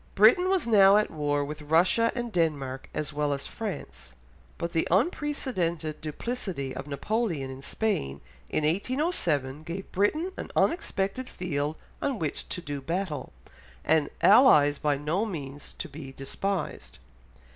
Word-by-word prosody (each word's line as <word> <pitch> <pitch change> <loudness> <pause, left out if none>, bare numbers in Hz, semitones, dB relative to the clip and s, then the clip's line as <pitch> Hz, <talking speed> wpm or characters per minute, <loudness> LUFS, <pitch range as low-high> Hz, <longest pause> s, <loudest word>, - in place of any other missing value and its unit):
Britain 240 - +6
was 380 -2 +2
now 200 -3 +7
at 210 - +1
war 145 -2 0
with 150 +1 -6
Russia 175 +9 +3
and 240 -2 -3
Denmark 145 -7 -1
as 150 0 -3
well 145 -1 0
as 140 - -6
France, 210 - -6 0.4
but 170 0 -3
the 165 - +1
unprecedented 185 - 0
duplicity 160 - -4
of 135 +2 -6
Napoleon 150 - -1
in 130 0 -9
Spain 105 - -1 0.3
in 155 - 0
1807 170 - 0
gave 175 +4 -6
Britain 305 - +1
an - - -5
unexpected 255 - 0
field 150 -4 -2 0.3
on 275 -4 0
which 160 -6 -3
to 180 - -3
do 145 -4 -5
battle, 165 +1 -3 0.5
and 155 -1 +3
allies 150 - +6
by 145 -2 +1
no 155 +8 0
means 145 -9 -6
to - - -4
be 145 -2 -9
despised. 160 +7 -4
165 Hz, 140 wpm, -28 LUFS, 145-215 Hz, 0.5 s, now